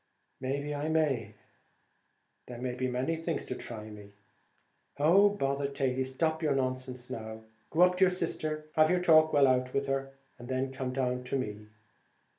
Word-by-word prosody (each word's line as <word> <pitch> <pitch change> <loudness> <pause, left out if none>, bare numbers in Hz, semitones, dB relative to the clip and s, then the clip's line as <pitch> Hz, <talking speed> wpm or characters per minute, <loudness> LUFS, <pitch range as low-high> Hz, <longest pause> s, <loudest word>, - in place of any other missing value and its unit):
"May 135 +2 -2
be 145 +1 -4
I 145 +2 -2
may! 135 -10 0 1.1
there 125 - -8 0.2
be 130 +1 -2
many 130 +6 -1
things 165 0 -3
to - - -4
try 115 -3 -7
me." 105 -1 -11 0.9
"Oh, 180 +8 +6
bother 140 -7 -1
Thady; 135 -2 -1
stop 160 +5 -1
with 155 - +1
your 140 - +2
nonsense 130 -1 -3
now. 110 0 -6 0.3
Go 165 - +1
up 180 0 +4
to 190 - +6
your - - +4
sister, 180 -3 -2
and 155 - -11
have 155 0 +6
your 180 0 +3
talk 155 -2 +6
well 145 -2 +5
out 130 -1 +1
with 140 - +1
her, 135 0 -2 0.3
and 120 - -9
then 130 +1 -1
come 130 -1 -3
down 125 -1 -1
to 130 - -2
me. 105 -4 -5
135 Hz, 185 wpm, -30 LUFS, 125-155 Hz, 1.1 s, Oh